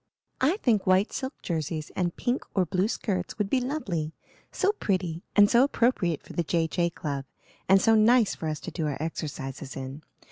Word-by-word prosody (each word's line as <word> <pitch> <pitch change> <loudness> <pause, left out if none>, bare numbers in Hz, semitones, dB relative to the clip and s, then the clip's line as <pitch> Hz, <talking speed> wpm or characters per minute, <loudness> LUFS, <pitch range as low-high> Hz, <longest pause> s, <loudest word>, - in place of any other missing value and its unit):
"I 305 +9 +3
think 225 - +1
white 185 +3 +3
silk 265 +1 -4
jerseys 155 -2 -3
and 175 -2 -1
pink 245 +2 -1
or 190 -2 +3
blue 185 +4 +1
skirts 190 -5 -2
would 210 -2 -1
be 265 - +3
lovely; 195 - -2 0.4
so 395 - +2
pretty 185 - -2
and 205 0 +8
so 235 +4 +5
appropriate 230 - +1
for - - -11
the - - 0
J. 165 0 +1
J. 170 +1 0
Club, 145 -5 -4 0.5
and 195 0 +7
so 225 +3 +4
nice 225 +1 +5
for 160 - -5
us 155 -1 -3
to - - -6
do 160 -3 -2
our 145 - -2
exercises 145 -4 -5
in. 135 +2 -6
185 Hz, 190 wpm, -27 LUFS, 160-225 Hz, 0.5 s, and